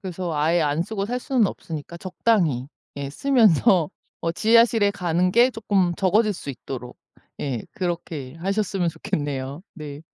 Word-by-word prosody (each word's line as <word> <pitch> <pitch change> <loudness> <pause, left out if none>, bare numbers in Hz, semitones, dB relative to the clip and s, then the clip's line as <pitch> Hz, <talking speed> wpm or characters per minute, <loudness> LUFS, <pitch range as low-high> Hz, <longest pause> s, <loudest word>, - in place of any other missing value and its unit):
그래서 180 -3 -4
아예 160 +3 +2
안 150 +2 +1
쓰고 200 +1 -3
살 250 +2 -2
수는 250 -6 +2
없으니까 160 -2 -6
적당히 175 - +1 0.3
예 140 -1 -4
쓰면서 205 - +4 0.3
어 165 0 -1
지하실에 225 0 +4
가는 180 -2 0
게 240 +5 +5
쪼끔 195 -6 +1
적어질 210 +3 +3
수 145 - -6
있도록 125 -1 -8 0.4
예 125 -6 -2
그렇게 165 -6 -4
하셨으면 195 0 -1
좋겠네요. 145 -1 -3
네. 150 -2 -8
175 Hz, 310 characters per minute, -23 LUFS, 150-205 Hz, 0.4 s, 게